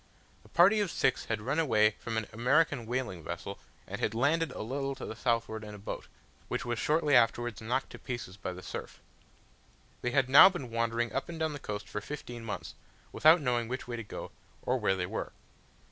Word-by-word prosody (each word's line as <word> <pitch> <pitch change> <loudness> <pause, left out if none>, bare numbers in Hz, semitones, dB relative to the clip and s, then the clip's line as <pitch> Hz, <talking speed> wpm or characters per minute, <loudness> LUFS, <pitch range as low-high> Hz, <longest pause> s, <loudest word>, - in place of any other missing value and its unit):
A - - -19
party 195 +5 +5
of 205 -3 +1
six 130 -5 +1
had 110 -2 -2
run 140 +7 0
away 110 -9 +4
from 115 -1 -3
an 110 - -1
American 125 +1 +2
whaling 120 -9 -3
vessel, 85 +4 -6 0.3
and - - -6
had - - 0
landed 155 +6 +2
a - - -5
little 135 +4 -2
to 130 - -7
the 110 - -6
southward 115 -2 -1
in 105 -1 -8
a - - -9
boat, 100 - -6 0.4
which - - -3
was 120 -2 -2
shortly 150 +3 +3
afterwards 120 -2 +2
knocked 125 +4 -1
to - - -10
pieces 120 -8 -6
by 100 -2 -5
the 90 0 -9
surf. - - -7 1.0
They 125 - 0
had 135 0 +2
now 140 +8 +10
been 140 -11 -6
wandering 115 0 0
up 135 - -2
and 165 -1 -6
down 160 -1 0
the 145 - -6
coast 105 -4 -5
for 105 - -4
fifteen 125 -5 -7
months, 110 - -5 0.4
without 160 +2 +6
knowing 120 -4 0
which 130 +2 -4
way 120 - -3
to 115 - -4
go, 105 - -7 0.3
or 125 +1 +1
where 100 -3 +2
they 90 -1 -1
were. - - -4
120 Hz, 210 wpm, -31 LUFS, 110-140 Hz, 1.0 s, now